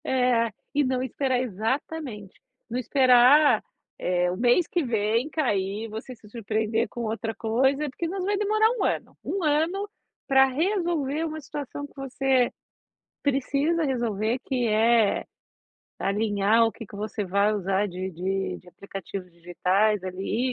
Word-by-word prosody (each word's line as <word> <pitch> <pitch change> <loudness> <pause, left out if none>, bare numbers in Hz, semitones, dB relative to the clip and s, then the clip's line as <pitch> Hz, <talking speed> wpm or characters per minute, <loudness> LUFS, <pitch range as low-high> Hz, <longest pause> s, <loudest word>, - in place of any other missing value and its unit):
É, 250 -3 +2 0.2
e 290 0 +3
não 255 -1 0
esperar 260 0 0
exatamente, 235 0 -3 0.4
não 240 +2 -2
esperar, 260 +3 +5 0.4
eh, 180 0 +1
o - - -3
mês 245 - +3
que 345 - 0
vem 230 +2 0
cair 210 -9 -1
e - - -6
você 225 +4 -7
se 220 -2 -18
surpreender 220 +1 -1
com 240 - -6
outra 225 0 -3
coisa, 265 +7 +1
porque 330 +6 -4
nos 375 +2 -3
vai 405 +2 +1
demorar 430 +2 +3
1 - - +1
ano, - - -2
1 390 -2 -2
ano 325 +7 +1 0.4
pra 270 0 +6
resolver 320 0 0
uma 315 -1 -4
situação 285 -1 -6
que 285 - -15
você 270 -2 +1 0.7
precisa 285 +4 +1
resolver, 235 -3 -1
que 250 -2 0
é 225 0 +3 0.7
alinhar 205 +2 +2
o - - 0
que 225 - -10
que 200 - -11
você 210 0 -3
vai 200 +3 +2
usar 195 0 0
de 185 +1 -5
de 190 +3 -2
de 180 - -18
aplicativos 195 0 -8
digitais 180 +4 +1
ali, 195 +7 -2
240 Hz, 150 wpm, -26 LUFS, 210-280 Hz, 0.7 s, pra